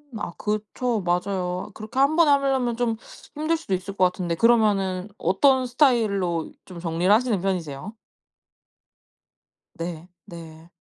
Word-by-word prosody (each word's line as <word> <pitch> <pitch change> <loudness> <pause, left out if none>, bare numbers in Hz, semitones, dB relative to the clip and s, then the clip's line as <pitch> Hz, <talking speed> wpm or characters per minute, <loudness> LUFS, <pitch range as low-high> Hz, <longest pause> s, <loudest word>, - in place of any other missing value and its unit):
아 210 -5 -4
그쵸. 215 +2 -2
맞아요. 180 +1 -2
그렇게 220 +4 -9
1 280 +3 +4
번에 335 -2 +5
하려면 270 -4 +2
좀 235 -2 0 0.4
힘들 315 +2 0
수도 200 -12 -5
있을 190 +2 -3
것 185 - +2
같은데 180 -2 -1
그러면은 205 -4 +2
어떤 260 +7 +3
스타일로 215 - +1
좀 180 -2 -10
정리를 170 +3 0
하시는 220 -3 +3
편이세요? 185 0 -3 1.8
네. 170 0 -5 0.2
네. 165 -1 -12
200 Hz, 265 characters per minute, -24 LUFS, 180-240 Hz, 1.8 s, 번에